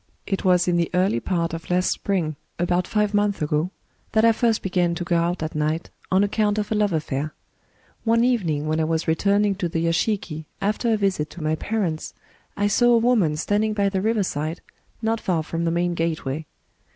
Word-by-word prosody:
"It 195 Hz, -, -2 dB
was 180 Hz, -1 st, +3 dB
in 175 Hz, -1 st, +2 dB
the 170 Hz, -1 st, +1 dB
early 180 Hz, -9 st, +2 dB
part 170 Hz, +2 st, -1 dB
of 165 Hz, 0 st, -6 dB
last 180 Hz, +1 st, +2 dB
spring 170 Hz, -6 st, -1 dB
— -, -, -45 dB
about 175 Hz, +1 st, +1 dB
five 210 Hz, -1 st, +1 dB
months 205 Hz, -1 st, +1 dB
ago 150 Hz, +3 st, 0 dB, 0.2 s
— -, -, -40 dB
that 220 Hz, +1 st, +4 dB
I 230 Hz, -, +7 dB
first 225 Hz, 0 st, +1 dB
began 180 Hz, -2 st, +1 dB
to 175 Hz, -, -3 dB
go 170 Hz, 0 st, 0 dB
out 170 Hz, 0 st, 0 dB
at 155 Hz, -, -4 dB
night, 155 Hz, +2 st, -1 dB, 0.2 s
on 190 Hz, +2 st, +4 dB
account 205 Hz, 0 st, +1 dB
of 210 Hz, 0 st, -2 dB
a -, -, +3 dB
love 210 Hz, -1 st, +2 dB
affiiir. 155 Hz, -3 st, -2 dB, 0.7 s
One 230 Hz, 0 st, +3 dB
even 240 Hz, -8 st, +2 dB
ing, 150 Hz, -1 st, -1 dB
when 155 Hz, +1 st, 0 dB
I -, -, +2 dB
was 160 Hz, +1 st, -1 dB
returning 200 Hz, +5 st, +2 dB
to 175 Hz, -3 st, -1 dB
the 165 Hz, 0 st, -1 dB
yashiki 165 Hz, -2 st, -1 dB
after 210 Hz, +3 st, 0 dB
a 220 Hz, -, +3 dB
visit 190 Hz, -7 st, 0 dB
to 170 Hz, -, -9 dB
my 155 Hz, 0 st, +1 dB
parents, 175 Hz, -2 st, -2 dB, 0.4 s
I 205 Hz, -, +1 dB
saw 240 Hz, +4 st, +4 dB
a -, -, +6 dB
woman 225 Hz, -10 st, +2 dB
standing 210 Hz, +5 st, 0 dB
by 200 Hz, -1 st, +2 dB
the 190 Hz, -1 st, -1 dB
riverside, 180 Hz, -7 st, -1 dB, 0.4 s
not 225 Hz, 0 st, 0 dB
far 170 Hz, -4 st, 0 dB
from 165 Hz, +2 st, -3 dB
the -, -, +2 dB
main 175 Hz, +1 st, 0 dB
gateway. 160 Hz, -3 st, -2 dB
180 Hz, 210 wpm, -23 LUFS, 160-210 Hz, 0.7 s, I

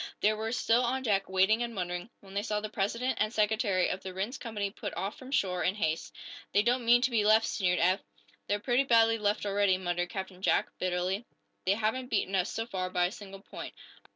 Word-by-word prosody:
They 210 Hz, +1 st, +3 dB
were 220 Hz, +1 st, -3 dB
still 245 Hz, 0 st, +2 dB
on 260 Hz, +2 st, -1 dB
deck, 200 Hz, -5 st, +1 dB
waiting 190 Hz, +4 st, +3 dB
and 235 Hz, -1 st, -3 dB
wondering, 180 Hz, +1 st, -3 dB
when 195 Hz, -1 st, -14 dB
they 200 Hz, -, 0 dB
saw 210 Hz, -1 st, -1 dB
the 215 Hz, 0 st, -5 dB
president 230 Hz, +6 st, -1 dB
and 215 Hz, 0 st, +1 dB
secretary 210 Hz, -4 st, +2 dB
of 185 Hz, -, -3 dB
the 185 Hz, -1 st, -7 dB
Rhinds 205 Hz, +8 st, -3 dB
company 210 Hz, -4 st, -3 dB
put -, -, -6 dB
off 195 Hz, +2 st, -3 dB
from 260 Hz, -, -11 dB
shore 185 Hz, -9 st, 0 dB
in 185 Hz, -, +1 dB
haste. 160 Hz, -, -1 dB, 0.4 s
"They 205 Hz, +2 st, +4 dB
don't 245 Hz, +1 st, +1 dB
mean 240 Hz, +1 st, +6 dB
to 260 Hz, -, +2 dB
be 225 Hz, -3 st, +2 dB
left," 220 Hz, +1 st, +5 dB
sneered 180 Hz, -2 st, +1 dB
Eph. 185 Hz, +3 st, +3 dB, 0.5 s
"They're 205 Hz, -, 0 dB
pretty 245 Hz, +4 st, +2 dB
badly 225 Hz, -3 st, +4 dB
left 210 Hz, 0 st, 0 dB
already," 200 Hz, -2 st, +2 dB
muttered 175 Hz, -1 st, -2 dB
Captain 190 Hz, -1 st, -6 dB
Jack, 210 Hz, -, +2 dB
bitterly. 185 Hz, +4 st, -1 dB, 0.4 s
"They 195 Hz, -, +4 dB
haven't 225 Hz, +4 st, -1 dB
beaten 195 Hz, -, 0 dB
us, 190 Hz, +1 st, +1 dB
so 225 Hz, -, -3 dB
far, 185 Hz, -5 st, -3 dB
by 180 Hz, -1 st, +2 dB
a 180 Hz, -, -1 dB
single 195 Hz, -2 st, -10 dB
point." -, -, -9 dB
205 Hz, 220 wpm, -30 LUFS, 190-225 Hz, 0.5 s, mean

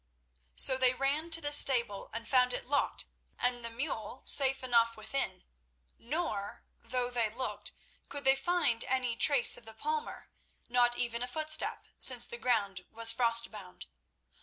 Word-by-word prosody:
So 260 Hz, -, +4 dB
they 255 Hz, -1 st, +2 dB
ran 285 Hz, +5 st, -3 dB
to 330 Hz, 0 st, +3 dB
the 290 Hz, -1 st, -3 dB
stable 240 Hz, -8 st, +3 dB
and 230 Hz, +1 st, -8 dB
found 250 Hz, -1 st, +1 dB
it -, -, -6 dB
locked 285 Hz, +2 st, -2 dB, 0.3 s
and 245 Hz, -1 st, +1 dB
the 230 Hz, -, -4 dB
mule 230 Hz, -1 st, -7 dB
safe 270 Hz, -1 st, +5 dB
enough 230 Hz, -2 st, 0 dB
within. 215 Hz, -4 st, -5 dB, 0.6 s
Nor—though 250 Hz, -3 st, -6 dB
they 235 Hz, -3 st, -2 dB
looked—could 260 Hz, +4 st, -9 dB
they 270 Hz, 0 st, +6 dB
find 325 Hz, -7 st, -2 dB
any 250 Hz, -2 st, -2 dB
trace 275 Hz, +1 st, +4 dB
of -, -, -15 dB
the 220 Hz, -, -13 dB
palmer—not 245 Hz, -, -4 dB
even 235 Hz, -1 st, -4 dB
a 245 Hz, -, -4 dB
footstep, 310 Hz, +3 st, +2 dB
since 245 Hz, -2 st, +5 dB
the 235 Hz, -, -9 dB
ground 200 Hz, -7 st, -2 dB
was 230 Hz, 0 st, +4 dB
frostbound. 230 Hz, -5 st, -2 dB
245 Hz, 140 wpm, -29 LUFS, 230-275 Hz, 0.6 s, they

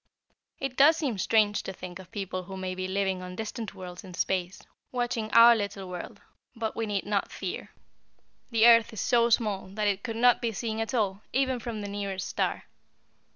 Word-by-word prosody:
It 270 Hz, -2 st, -4 dB
does 305 Hz, +4 st, +7 dB
seem 265 Hz, -, -2 dB
strange 210 Hz, 0 st, +3 dB
to -, -, -5 dB
think 180 Hz, -1 st, -9 dB
of 185 Hz, -, -12 dB
people 190 Hz, -2 st, -4 dB
who 190 Hz, +1 st, -7 dB
may 185 Hz, -1 st, -3 dB
be 185 Hz, 0 st, -3 dB
living 190 Hz, -1 st, -1 dB
on 180 Hz, 0 st, -7 dB
distant 220 Hz, 0 st, -5 dB
worlds 180 Hz, +1 st, -8 dB
in 185 Hz, -2 st, -10 dB
space, 185 Hz, +1 st, -1 dB, 0.3 s
watching 240 Hz, -3 st, -2 dB
our 235 Hz, +2 st, +8 dB
little 200 Hz, -3 st, -4 dB
world, 180 Hz, -1 st, -7 dB, 0.3 s
but 225 Hz, -1 st, -3 dB
we 225 Hz, -1 st, -2 dB
need 205 Hz, -2 st, -2 dB
not 205 Hz, -1 st, -1 dB
fear. -, -, -5 dB, 0.8 s
The 230 Hz, -2 st, +4 dB
earth 230 Hz, -1 st, +7 dB
is 220 Hz, -, -6 dB
so 235 Hz, -1 st, +3 dB
small 215 Hz, -5 st, +1 dB
that 210 Hz, +3 st, -3 dB
it 200 Hz, -1 st, 0 dB
could 230 Hz, -3 st, -4 dB
not 245 Hz, +1 st, +4 dB
be 230 Hz, -2 st, -1 dB
seen 220 Hz, +1 st, -3 dB
at 225 Hz, +3 st, -2 dB
all, 200 Hz, -3 st, 0 dB
even 260 Hz, -1 st, +1 dB
from 230 Hz, -2 st, -5 dB
the 205 Hz, -, -4 dB
nearest 200 Hz, -2 st, -4 dB
star. -, -, -1 dB
210 Hz, 200 wpm, -28 LUFS, 190-230 Hz, 0.8 s, our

